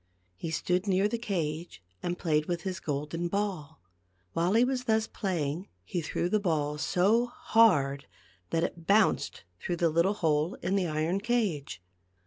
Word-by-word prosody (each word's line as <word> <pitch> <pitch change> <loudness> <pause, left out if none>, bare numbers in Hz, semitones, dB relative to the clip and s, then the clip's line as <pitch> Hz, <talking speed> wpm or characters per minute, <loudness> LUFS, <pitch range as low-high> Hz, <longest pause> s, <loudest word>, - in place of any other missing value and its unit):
He 160 - -5
stood 180 +5 0
near 195 +1 +3
the 235 +2 -3
cage 165 - -3 0.2
and 175 0 -2
played 155 -3 +1
with 175 -1 -2
his 185 -2 -3
golden 150 +4 -3
ball. 185 - -3 0.5
While 175 +3 +1
he 235 - +6
was 255 -1 -2
thus 220 -1 +2
playing 175 -4 -2 0.2
he 170 - -3
threw 165 +2 -1
the 215 +4 +2
ball 150 -6 -1
so 210 +10 +3
hard 145 - +3 0.4
that 165 - +1
it 170 -1 -4
bounced 210 +1 +2 0.2
through 175 - -2
the 170 0 +3
little 170 +6 +2
hole 160 -1 +1
in 185 +3 +1
the 190 -3 +1
iron 160 +4 0
cage. 195 - -1
175 Hz, 160 wpm, -29 LUFS, 155-200 Hz, 0.5 s, he